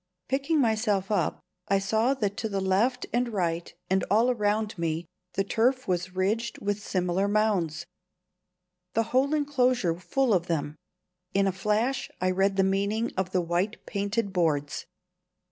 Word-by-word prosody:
Picking 280 Hz, +4 st, +1 dB
myself 215 Hz, -5 st, +1 dB
up, 210 Hz, -, 0 dB, 0.3 s
I 195 Hz, -, +3 dB
saw 220 Hz, +7 st, +1 dB
that 205 Hz, -6 st, -1 dB
to 220 Hz, -, -2 dB
left 205 Hz, +7 st, +1 dB
and 240 Hz, 0 st, +1 dB
right 170 Hz, -4 st, -1 dB, 0.2 s
and 190 Hz, 0 st, +1 dB
all 225 Hz, +5 st, +4 dB
around 215 Hz, -1 st, 0 dB
me 165 Hz, -1 st, -2 dB, 0.3 s
the 195 Hz, -, +1 dB
turf 250 Hz, +6 st, +1 dB
was 180 Hz, 0 st, -1 dB
ridged 210 Hz, +5 st, 0 dB
with 205 Hz, 0 st, -2 dB
similar 185 Hz, 0 st, 0 dB
mounds, 195 Hz, -7 st, +1 dB, 1.1 s
the 225 Hz, -, +3 dB
whole 275 Hz, +4 st, +3 dB
enclosure 255 Hz, -, +2 dB
full 260 Hz, +5 st, +1 dB
of 175 Hz, -2 st, +1 dB
them. 150 Hz, -3 st, -2 dB, 0.6 s
In 195 Hz, 0 st, +4 dB
a 195 Hz, -, +2 dB
flash 215 Hz, +7 st, 0 dB
I 185 Hz, 0 st, +1 dB
read 195 Hz, +1 st, +2 dB
the 195 Hz, -, +3 dB
meaning 200 Hz, +4 st, 0 dB
of 185 Hz, -1 st, -1 dB
the 185 Hz, -, +2 dB
white 175 Hz, +5 st, -1 dB
painted 200 Hz, 0 st, -2 dB
boards. 150 Hz, -5 st, 0 dB
200 Hz, 150 wpm, -27 LUFS, 185-230 Hz, 1.1 s, all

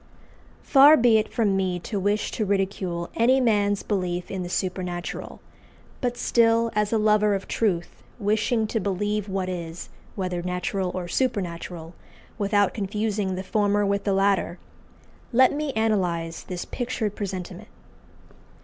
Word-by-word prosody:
Far 285 Hz, +3 st, +7 dB
be 230 Hz, -2 st, +5 dB
it 215 Hz, -, -3 dB
from 210 Hz, -4 st, +1 dB
me 185 Hz, -2 st, 0 dB
to 205 Hz, +3 st, -3 dB
wish 205 Hz, +2 st, 0 dB
to 220 Hz, -, -2 dB
ridicule 190 Hz, -3 st, -2 dB
any 255 Hz, +4 st, +4 dB
man's 205 Hz, -5 st, +2 dB
belief 180 Hz, -3 st, -2 dB
in 190 Hz, -, -3 dB
the 175 Hz, -, -5 dB
supernatural; 180 Hz, -1 st, -4 dB, 0.6 s
but 245 Hz, -2 st, -1 dB
still, 230 Hz, -1 st, +3 dB
as 210 Hz, -1 st, 0 dB
a 225 Hz, -, +3 dB
lover 210 Hz, -1 st, +3 dB
of 195 Hz, -, -5 dB
truth, 185 Hz, -7 st, -1 dB, 0.2 s
wishing 220 Hz, +1 st, +1 dB
to 220 Hz, +1 st, -1 dB
believe 205 Hz, +1 st, -1 dB
what 190 Hz, -1 st, -2 dB
is, 170 Hz, -2 st, -6 dB, 0.3 s
whether 180 Hz, -3 st, -2 dB
natural 180 Hz, +1 st, -2 dB
or 180 Hz, -1 st, -3 dB
supernatural, 175 Hz, -7 st, -3 dB, 0.5 s
without 205 Hz, -1 st, +2 dB
confusing 210 Hz, -1 st, -2 dB
the 190 Hz, -, -4 dB
former 205 Hz, +1 st, +1 dB
with 200 Hz, 0 st, 0 dB
the 200 Hz, -, +1 dB
latter, 195 Hz, -2 st, +1 dB, 0.7 s
let 255 Hz, +1 st, +5 dB
me 300 Hz, 0 st, -2 dB
analyse 180 Hz, -7 st, 0 dB
this 180 Hz, -1 st, -6 dB
pictured 235 Hz, -4 st, -3 dB
presentiment. 190 Hz, 0 st, -5 dB
200 Hz, 140 wpm, -25 LUFS, 185-220 Hz, 0.7 s, Far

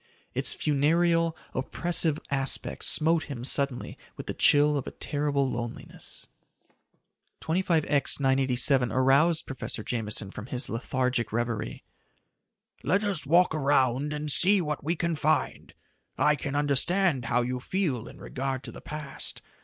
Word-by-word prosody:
Its -, -, -2 dB
funereal, 165 Hz, +3 st, +1 dB, 0.2 s
oppressive 160 Hz, +3 st, 0 dB
aspect 135 Hz, -1 st, -1 dB
smote 160 Hz, 0 st, +2 dB
him 130 Hz, -5 st, -7 dB
suddenly 140 Hz, -1 st, -1 dB, 0.2 s
with -, -, -7 dB
the -, -, -4 dB
chill 145 Hz, +1 st, +4 dB
of 140 Hz, -, -3 dB
a -, -, -5 dB
terrible 145 Hz, -2 st, -1 dB
loneliness. 120 Hz, -2 st, -7 dB, 1.2 s
25X 160 Hz, -5 st, +1 dB
987 130 Hz, -2 st, +2 dB
aroused 140 Hz, +7 st, +3 dB
Professor 130 Hz, -4 st, -4 dB
Jameson 105 Hz, -4 st, -2 dB
from 105 Hz, -, -8 dB
his 130 Hz, +1 st, -3 dB
lethargic 125 Hz, 0 st, -1 dB
reverie. 115 Hz, -1 st, -3 dB, 1.0 s
"Let 195 Hz, -, +1 dB
us 190 Hz, -8 st, +1 dB
walk 175 Hz, +3 st, +4 dB
around 140 Hz, -1 st, +1 dB
and 150 Hz, 0 st, 0 dB
see 195 Hz, +7 st, +7 dB
what 150 Hz, -5 st, -3 dB
we 165 Hz, +4 st, -1 dB
can 170 Hz, 0 st, -1 dB
find. 155 Hz, 0 st, -1 dB, 0.5 s
I 150 Hz, 0 st, +3 dB
can 140 Hz, -1 st, -5 dB
understand 145 Hz, +1 st, +2 dB
how 120 Hz, +2 st, +1 dB
you 125 Hz, +1 st, -3 dB
feel 145 Hz, -, -2 dB
in -, -, -12 dB
regard 135 Hz, 0 st, -4 dB
to -, -, -8 dB
the -, -, -11 dB
past. 150 Hz, -2 st, -7 dB
140 Hz, 135 wpm, -27 LUFS, 130-160 Hz, 1.2 s, see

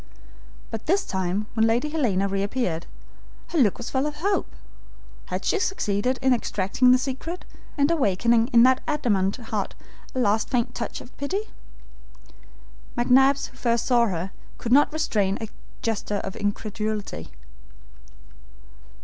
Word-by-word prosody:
But 225 Hz, +3 st, -6 dB
this 385 Hz, +5 st, +2 dB
time 190 Hz, +2 st, -1 dB
when 225 Hz, -1 st, +3 dB
Lady 240 Hz, +6 st, +1 dB
Helena 225 Hz, -11 st, +1 dB
reappeared, 195 Hz, -3 st, -1 dB, 0.6 s
her 335 Hz, -, 0 dB
look 215 Hz, -8 st, +4 dB
was 240 Hz, -, -6 dB
full 265 Hz, +2 st, +1 dB
of 300 Hz, -, -4 dB
hope. 390 Hz, +6 st, 0 dB, 0.8 s
Had -, -, -4 dB
she 415 Hz, -, +2 dB
succeeded 255 Hz, -, 0 dB
in 260 Hz, -1 st, +5 dB
extracting 225 Hz, +1 st, +1 dB
the 255 Hz, -, +7 dB
secret, 275 Hz, +7 st, -4 dB, 0.3 s
and 285 Hz, +2 st, +3 dB
awakening 235 Hz, -, +3 dB
in 235 Hz, -3 st, +6 dB
that 260 Hz, +1 st, +5 dB
adamant 205 Hz, -11 st, +1 dB
heart 220 Hz, -4 st, -4 dB, 0.4 s
a -, -, 0 dB
last 215 Hz, -2 st, +2 dB
faint 240 Hz, -2 st, 0 dB
touch 235 Hz, -, -4 dB
of 245 Hz, -, -14 dB
pity? 390 Hz, +10 st, -3 dB, 1.5 s
McNabbs, 265 Hz, +3 st, +4 dB
who 260 Hz, -, -19 dB
first 235 Hz, -2 st, +1 dB
saw 240 Hz, -2 st, +4 dB
her, 185 Hz, -1 st, -3 dB, 0.3 s
could 235 Hz, -, -4 dB
not 290 Hz, +3 st, +6 dB
restrain 210 Hz, -11 st, 0 dB
a 225 Hz, -, -5 dB, 0.3 s
gesture 210 Hz, -2 st, -1 dB
of 190 Hz, -, -5 dB
incredulity. 205 Hz, -, -3 dB
235 Hz, 140 wpm, -25 LUFS, 205-270 Hz, 1.5 s, the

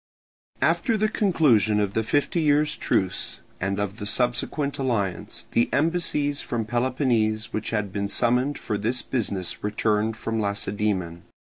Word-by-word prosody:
After 230 Hz, -4 st, +2 dB
the 215 Hz, +1 st, +2 dB
conclusion 145 Hz, -, +3 dB
of 100 Hz, -1 st, 0 dB
the 110 Hz, -, +1 dB
fifty 145 Hz, +8 st, +1 dB
years' 150 Hz, 0 st, +3 dB
truce 95 Hz, -2 st, 0 dB, 0.2 s
and 95 Hz, +1 st, -1 dB
of 105 Hz, 0 st, -2 dB
the 105 Hz, -3 st, -4 dB
subsequent 125 Hz, +6 st, 0 dB
alliance, 105 Hz, -9 st, -2 dB
the 115 Hz, -, +2 dB
embassies 150 Hz, -2 st, +1 dB
from 115 Hz, -2 st, -2 dB
Peloponnese 120 Hz, -3 st, 0 dB
which 110 Hz, -, -2 dB
had 105 Hz, -3 st, -2 dB
been 100 Hz, 0 st, -2 dB
summoned 125 Hz, +6 st, +1 dB
for 105 Hz, -3 st, -3 dB
this 120 Hz, +4 st, -1 dB
business 100 Hz, -7 st, -2 dB
returned 105 Hz, +1 st, 0 dB
from 115 Hz, 0 st, -2 dB
Lacedaemon. 100 Hz, -4 st, -2 dB
115 Hz, 140 wpm, -25 LUFS, 105-140 Hz, 0.2 s, conclusion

